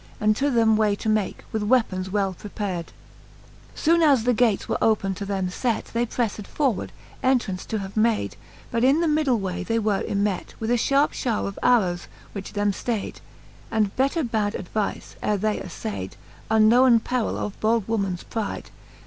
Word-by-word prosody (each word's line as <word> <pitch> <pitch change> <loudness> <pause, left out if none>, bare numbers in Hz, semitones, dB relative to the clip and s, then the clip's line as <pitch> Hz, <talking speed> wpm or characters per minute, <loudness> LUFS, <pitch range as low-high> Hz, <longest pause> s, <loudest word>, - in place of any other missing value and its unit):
And 215 0 +3
to 285 +1 +1
them 225 -4 +4
way 210 -2 +2
.to 210 - -6
make, 215 -3 0
with 220 - -1
weapons 205 -5 +1
well 195 -1 0
prepard. 190 -3 -5
XXXVIII. - - -24
Soone 335 +1 +3
as 280 -7 +5
the 245 +1 +3
gates 225 -3 +2
were - - -1
open 205 -3 +2
to 200 +1 -6
them 190 -2 -1
fet, 230 +5 -2
They 235 +1 +1
prefTed 220 -4 -2
forward, 265 -10 -1 0.3
entraunce 235 -8 +1
to 220 - -2
have 195 -1 -6
made; 220 0 +1 0.4
But 235 0 0
in 275 +5 +4
the 335 - +2
middle 300 -5 +2
way 185 -1 -3
they 225 +4 0
were 210 -3 +1
ymet 200 -2 -2
With 225 +1 -2
a - - +4
fharpe 280 +5 +3
fhowre 235 -5 -1
of 200 - -6
arrowes, 190 -8 +2 0.2
which 195 -2 -7
them 205 -1 +1
ftaid, 220 +1 -3 0.5
And 215 -3 0
better 275 +5 +1
bad 220 -4 0
advife, 205 +2 -4
ere 210 - +1
they 210 +2 0
aflaid 100 - -5 0.4
Unknowen 230 +3 +6
perill 250 -3 -1
of 210 - -3
I - - +3
old 225 -3 +2
womens 195 -5 -1
pride. 220 -3 -4
215 Hz, 185 wpm, -24 LUFS, 200-240 Hz, 0.5 s, Unknowen